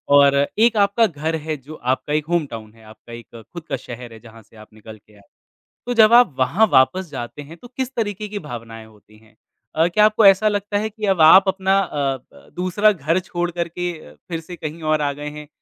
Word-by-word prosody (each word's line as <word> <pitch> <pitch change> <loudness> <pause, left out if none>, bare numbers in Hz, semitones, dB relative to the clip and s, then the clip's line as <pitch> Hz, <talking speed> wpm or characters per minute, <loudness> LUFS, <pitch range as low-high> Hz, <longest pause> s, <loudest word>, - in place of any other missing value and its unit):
और 140 -1 +5 0.2
एक 230 0 +4
आपका 205 +3 +3
घर 160 0 -4
है 155 -1 -3
जो 145 +4 -12 0.2
आपका 145 +3 -3
एक 150 0 0
होम 170 -3 +1
टाउन 110 -2 -10
है, 115 -1 -20
आपका 110 +2 -15
एक 115 0 -12
खुद 170 - -8
का - - -1
शहर 120 -1 -10
है 110 - -13
जहाँ 115 -1 -15
से 115 - -25
आप 110 0 -16
निकल 110 0 -13
के 105 +1 -26
आए। 100 - -20 0.7
तो 245 - -2
जब 220 0 +5
आप 240 - +5
वहाँ 185 +12 +3
वापस 180 +8 +3
जाते 120 +4 -7
हैं 160 +4 -13
तो 245 - -15
किस 260 +1 -5
तरीके 210 -2 -3
की 205 - -5
भावनाएँ 115 - -9
होती 105 0 -21
हैं? 110 0 -25 0.4
अ, 160 +2 +3
क्या 210 +4 +3
आपको 215 0 +3
ऐसा 195 +2 +5
लगता 205 0 -2
है 220 +1 -3
कि 215 -1 -5
अब 190 -4 +1
आप 190 +5 +7
अपना 190 +1 +1
अ 180 - -5 0.4
ब - - -19
दूसरा 195 +4 +2
घर 165 0 -1
छोड़ 175 -1 -4
कर 170 0 -3
के 175 +1 -4
अ, 75 - -15
फिर 165 -2 -4
से 175 +2 -10
कहीं 155 +1 -7
और 155 0 0
आ 145 -1 0
गए 145 +1 -7
हैं? 150 0 -10
160 Hz, 240 wpm, -20 LUFS, 120-195 Hz, 0.7 s, आप